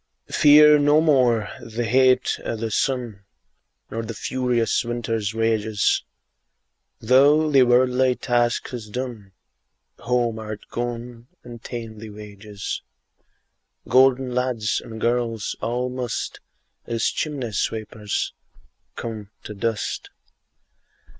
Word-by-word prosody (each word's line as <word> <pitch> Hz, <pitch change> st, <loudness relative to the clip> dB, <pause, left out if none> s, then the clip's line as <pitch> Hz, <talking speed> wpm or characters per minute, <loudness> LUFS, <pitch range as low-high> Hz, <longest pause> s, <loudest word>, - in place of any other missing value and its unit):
2. -, -, -11 dB
Fear 150 Hz, 0 st, +7 dB
no 145 Hz, +1 st, +4 dB
more 125 Hz, -8 st, +3 dB
the 115 Hz, +1 st, -4 dB
heat 130 Hz, +2 st, +3 dB
o' -, -, -3 dB
the 110 Hz, 0 st, -4 dB
sun, 120 Hz, -5 st, -1 dB, 0.7 s
Nor 115 Hz, -, -3 dB
the 115 Hz, 0 st, -6 dB
furious 125 Hz, -1 st, 0 dB
winter's 115 Hz, -3 st, -2 dB
rages; 110 Hz, -2 st, +1 dB, 1.0 s
Thou 145 Hz, +6 st, +4 dB
thy 135 Hz, -2 st, +6 dB
worldly 125 Hz, +1 st, +3 dB
task 120 Hz, -2 st, 0 dB
hast 110 Hz, -4 st, -8 dB
done, 120 Hz, -6 st, -5 dB, 0.7 s
Home 120 Hz, -2 st, 0 dB
art 110 Hz, -1 st, -7 dB
gone, 120 Hz, 0 st, -5 dB, 0.2 s
and 120 Hz, -1 st, -10 dB
ta'en 115 Hz, -3 st, -7 dB
thy 110 Hz, 0 st, -8 dB
wages: 105 Hz, 0 st, -7 dB, 1.1 s
Golden 130 Hz, -1 st, +4 dB
lads 125 Hz, -4 st, 0 dB
and 110 Hz, -1 st, -9 dB
girls 115 Hz, -2 st, -1 dB
all 125 Hz, +2 st, -1 dB
must, 125 Hz, -1 st, -4 dB, 0.5 s
As 115 Hz, -1 st, -1 dB
chimney 140 Hz, -7 st, -2 dB
sweepers, 105 Hz, 0 st, -3 dB, 0.6 s
come 110 Hz, -3 st, -6 dB
to 105 Hz, -, -7 dB
dust. 110 Hz, +1 st, -3 dB
120 Hz, 110 wpm, -23 LUFS, 110-125 Hz, 1.1 s, Fear